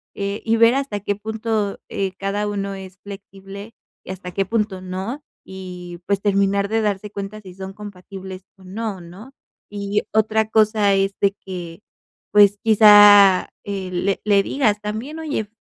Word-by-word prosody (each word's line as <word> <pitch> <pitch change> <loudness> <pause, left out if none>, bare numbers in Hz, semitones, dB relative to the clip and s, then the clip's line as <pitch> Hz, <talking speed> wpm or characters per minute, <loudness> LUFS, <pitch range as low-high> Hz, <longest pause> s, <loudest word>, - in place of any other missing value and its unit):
eh 200 0 -4
y 225 0 +2
ver 230 +2 +5
hasta 275 -7 -2
qué 205 0 -2
punto, 220 -1 -3
eh, 195 -1 -2
cada 200 +1 -2
uno 200 -1 -3
es 190 -1 -10
flexible 200 +1 -10 0.3
y - - -8
hasta 185 -1 -8
qué 195 +2 -1
punto 210 -2 -2
no, 190 +10 -5 0.2
y 180 -2 -9
pues 200 -1 0
terminar 200 0 +1
de 225 +1 +1
darse 210 -1 -2
cuenta 200 +1 -7
si 185 -3 -12
son 190 0 -8
compatibles 190 -2 -10
o 190 - -19
no, 200 0 -5
¿no? 190 +10 -13 0.4
Y 205 0 -2
otra 220 0 +1
cosa 215 -2 +3
es 195 0 +1
de 200 - +4
que, 175 -1 -7 0.5
pues 205 -1 +5
quizá, 205 -3 +7
eh, 195 -2 -5
le 185 +2 -1
le 200 -2 +4
digas 210 -4 0
también: 220 +9 -5
"Oye, 295 -9 -3
200 Hz, 160 wpm, -21 LUFS, 190-215 Hz, 0.5 s, quizá